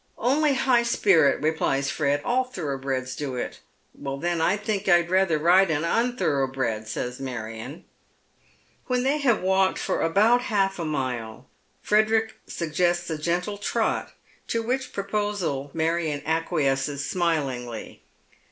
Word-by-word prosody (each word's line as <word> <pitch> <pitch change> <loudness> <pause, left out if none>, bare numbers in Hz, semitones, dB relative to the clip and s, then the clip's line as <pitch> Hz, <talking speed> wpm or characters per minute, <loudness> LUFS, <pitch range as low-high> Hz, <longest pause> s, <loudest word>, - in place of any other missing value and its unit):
" - - -40 0.2
Only 300 -1 +2
high 255 -2 +3
spirit," 190 -12 +3
replies 140 -3 +1
Fred, 145 -1 0
" - - -16
all 255 +2 +2
thoroughbreds 135 - -4
do 140 -3 -4
it." 125 - -4 0.3
"Then 160 +5 -3
I 180 +5 +2
think 210 -2 -3
I'd 175 -1 +4
rather 185 -4 +3
ride 175 +4 +4
an 155 -1 0
unthorough 170 - +1
bred," 115 -5 -2
says 125 +3 -4
Marion. 115 -4 -6 1.0
When 250 0 +1
they 280 +3 +1
have 240 -9 +2
walked 190 0 +2
for - - -1
about 215 +9 +4
half 195 -6 0
a 165 - -2
mile 125 -7 -3 0.4
Frederick 220 +1 +2
Buggesits 175 +1 -1
a 160 - -2
gentle 180 +6 -1
trot, - - -1 0.3
to 230 0 -1
which 255 +3 -2
proposal 200 -8 -2
Marion 160 -2 -1
acquiesces 145 -3 0
smilingly. 135 -10 -2
170 Hz, 135 wpm, -25 LUFS, 140-205 Hz, 1.0 s, I'd